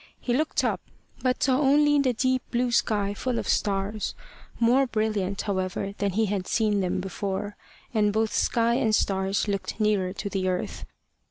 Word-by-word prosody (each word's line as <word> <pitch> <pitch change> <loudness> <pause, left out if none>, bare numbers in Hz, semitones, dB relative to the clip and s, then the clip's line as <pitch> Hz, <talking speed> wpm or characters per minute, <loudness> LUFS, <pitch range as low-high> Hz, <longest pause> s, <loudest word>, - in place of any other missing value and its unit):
He 245 - -1
looked 305 +5 +1
up, - - 0 0.4
but 255 -1 0
saw 260 0 +3
only 295 +1 +4
the 265 -2 +3
deep 255 +2 +1
blue 245 0 0
sky 205 -3 +1
full 245 +3 -2
of - - -3
stars 200 +1 -1 0.4
more 250 +3 +4
brilliant, 215 -4 -1
however, 195 0 -2
than 200 -2 0
he 220 +3 +2
had 195 -2 -2
seen 215 -3 +1
them 185 -1 0
before; 195 +2 -4 0.4
and 210 -2 +3
both 220 +1 0
sky 235 0 +2
and 225 -3 +2
stars 195 +1 0
looked 200 +2 -3
nearer 205 -4 +1
to 200 - -5
the 190 -2 -1
earth. 180 -1 -3
210 Hz, 170 wpm, -26 LUFS, 195-240 Hz, 0.4 s, only